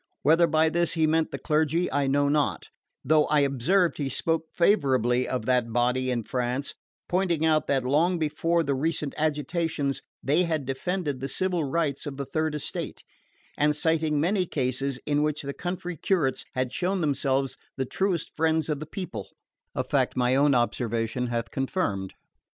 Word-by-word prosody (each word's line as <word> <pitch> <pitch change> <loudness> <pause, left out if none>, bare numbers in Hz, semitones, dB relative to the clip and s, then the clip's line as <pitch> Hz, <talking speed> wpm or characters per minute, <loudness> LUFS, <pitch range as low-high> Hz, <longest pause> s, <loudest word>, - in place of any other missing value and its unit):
Whether 165 +4 +5
by 160 0 +3
this 170 +1 +1
he 160 -2 +2
meant 160 0 +2
the - - -5
clergy 160 +3 +1
I 140 0 +1
know 140 +1 +2
not; 140 - 0 0.4
though 155 +2 +4
I 150 -1 +3
observed 140 +8 +2
he 140 -2 -1
spoke 165 +4 -1
favourably 130 - +2
of 125 -4 -2
that 125 -2 +1
body 125 +2 +1
in 120 -2 -1
France, 125 +3 -2 0.3
pointing 175 -3 +1
out 155 -1 +2
that, 135 -2 +1
long 160 +8 +2
before 165 +2 +1
the 140 - 0
recent 150 +1 -1
agitations, 150 -1 -1 0.2
they 150 +6 +3
had 160 -5 -1
defended 145 +2 -2
the 135 - -3
civil 180 +2 0
rights 145 -1 -1
of 140 -2 -6
the 140 - -3
Third 155 +2 -1
Estate, 150 - -5 0.5
and 150 0 +2
citing 160 -1 +1
many 180 +3 +1
cases 135 -1 -1
in 145 0 +1
which 150 0 -1
the 140 0 -4
country 180 +1 -4
curates 155 -5 0
had 130 -1 -1
shown 185 +1 0
themselves 135 -3 0 0.2
the 130 - 0
truest 185 +4 -1
friends 160 -1 +1
of 150 -2 -1
the 155 - -7
people: 185 +3 -6 0.5
a - - 0
fact - - 0
my 125 +1 +3
own 140 0 +4
observation 120 0 0
hath 115 -1 -3
confirmed. 130 - -2
150 Hz, 170 wpm, -26 LUFS, 130-165 Hz, 0.5 s, Whether